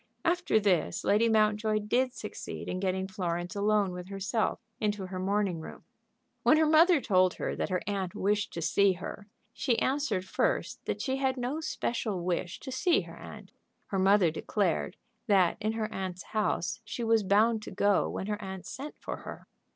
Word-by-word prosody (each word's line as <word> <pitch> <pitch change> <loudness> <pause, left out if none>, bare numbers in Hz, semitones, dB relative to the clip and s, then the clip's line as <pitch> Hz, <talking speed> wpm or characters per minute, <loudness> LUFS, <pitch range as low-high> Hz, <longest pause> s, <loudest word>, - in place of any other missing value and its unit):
After 345 -9 +2
this, 180 - +1
Lady 220 +3 +3
Mountjoy 215 0 +2
did 245 +5 +1
succeed - - -7
in 185 - -2
getting 190 0 -1
Florence 175 -2 -3
alone 205 -1 +2
with 180 +1 -7
herself 200 +3 -1 0.2
into 205 -2 -1
her 185 0 -5
morning 195 -2 0
room. 160 - -10 0.6
When 310 - +5
her 315 - +4
mother 320 +2 +6
told 185 -7 +3
her - - -3
that - - -2
her 185 -1 -1
aunt 195 -3 -2
wished 205 +1 0
to 170 - -4
see 195 +4 +4
her, 195 +3 -8 0.3
she 240 -4 0
answered 260 -9 0
first 185 - -1
that - - -2
she 265 -1 -1
had 265 -1 0
no 255 +5 -2
special 220 - -2
wish 175 0 -2
to 265 - -7
see 330 +7 +2
her - - -11
aunt. - - -11 0.4
Her 195 - -1
mother 190 -3 +5
declared 180 +2 -1 0.3
that 190 -4 +4
in 215 +1 0
her 220 -1 -1
aunt's 185 -1 -4
house 210 -2 0
she 225 +3 -5
was 225 -1 +3
bound 215 +3 +3
to - - -8
go 200 0 +2
when - - -4
her 210 +1 -3
aunt 190 -2 -7
sent 290 +3 -7
for - - -5
her. - - -9
205 Hz, 180 wpm, -30 LUFS, 185-225 Hz, 0.6 s, mother